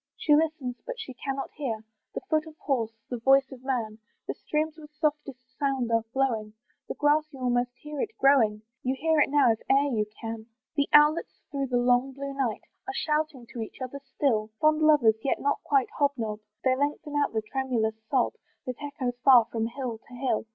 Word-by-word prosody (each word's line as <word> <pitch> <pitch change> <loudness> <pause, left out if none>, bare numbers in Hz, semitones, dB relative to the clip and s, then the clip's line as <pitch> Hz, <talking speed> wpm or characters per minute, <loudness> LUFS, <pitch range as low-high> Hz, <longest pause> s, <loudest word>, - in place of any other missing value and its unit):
She 300 - +3
listens, 300 -6 -1
but - - -6
she 275 -12 -6
cannot 270 +2 -4
hear 230 -7 -4 0.3
The - - -2
foot 315 -4 0
of 315 -1 -12
horse, 230 -5 -1
the 245 - -2
voice 270 +3 +4
of 260 -1 -11
man; 230 -5 -2 0.3
The - - -1
streams 310 +1 -2
with 305 -2 -12
softest 300 -4 -1 0.2
sound 270 -4 0
are 230 0 +3
flowing, 225 -6 0 0.3
The - - -4
grass 300 +1 +2
you 270 - -11
almost 245 -1 0
hear 300 -1 -6
it 445 - -4
growing, 225 -6 +4 0.2
You 260 +1 0
hear 320 0 +3
it 295 - +4
now 285 -4 +5
if 225 - -1
e'er 275 -1 +3
you 210 -1 0
can. 225 -1 -6 0.3
The 285 -1 +1
owlets 300 +2 +4
through 275 -1 -1
the 245 -1 +1
long 245 +2 +3
blue 275 +1 -5
night 260 -6 -2 0.2
Are 395 - -4
shouting 305 -6 -1
to 235 - -4
each 220 - -7
other 260 +2 -5
still: 265 -5 0
Fond 310 0 +3
lovers, 255 -8 +5
yet 275 - 0
not 285 - 0
quite 275 -3 +2
hob 285 -1 +3
nob, 215 -2 -3 0.2
They 260 -1 +3
lengthen 290 +2 -2
out 290 -4 +1
the 220 -1 -1
tremulous 225 -3 -1
sob, 260 -3 +2 0.3
That 255 -2 -5
echoes 270 -4 -4
far 250 -4 +8
from 225 -1 -1
hill 235 -2 -5
to 250 - -18
hill. 245 -3 -1
270 Hz, 200 wpm, -27 LUFS, 240-295 Hz, 0.3 s, far